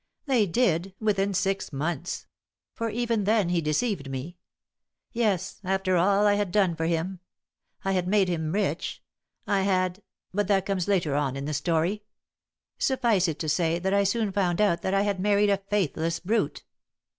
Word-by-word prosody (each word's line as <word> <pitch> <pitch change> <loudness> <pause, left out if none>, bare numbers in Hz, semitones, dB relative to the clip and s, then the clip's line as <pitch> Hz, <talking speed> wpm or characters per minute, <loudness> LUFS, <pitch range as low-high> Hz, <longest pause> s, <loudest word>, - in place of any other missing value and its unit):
"They 250 -7 +3
did, 185 -2 +1
within 200 -2 +1
six 195 +1 -1
months. 155 +3 -3 0.5
For 230 -1 -2
even 230 -2 -1
then 210 -4 +2
he 175 -1 +1
deceived 155 - -1
me. 140 +7 -6 0.7
Yes, 205 -6 -1
after 190 0 0
all 200 +4 +3
I 205 - +5
had 205 -3 0
done 190 -4 +2
for 165 0 -1
him. 170 +3 -1 0.7
I 195 - +1
had 180 -2 0
made 195 0 +3
him 160 -3 -1
rich. 190 -3 -2 0.4
I 200 -1 +1
had 185 0 0 0.3
but 205 0 0
that 195 -2 +2
comes 195 -3 -1
later 175 -8 +1
on 140 -2 0
in 140 0 -4
the 155 - -3
story. 165 +7 0 0.8
Suffice 230 -8 +2
it 160 -2 -2
to 160 - -4
say, 165 +2 +1
that 190 +2 -1
I 200 0 +4
soon 210 +1 0
found 185 -3 0
out 205 -5 +2
that 190 - 0
I 195 - +3
had 200 -2 -1
married 205 +1 +3
a 200 - +3
faithless 165 -4 0
brute." 215 +6 -1
190 Hz, 175 wpm, -26 LUFS, 170-205 Hz, 0.8 s, I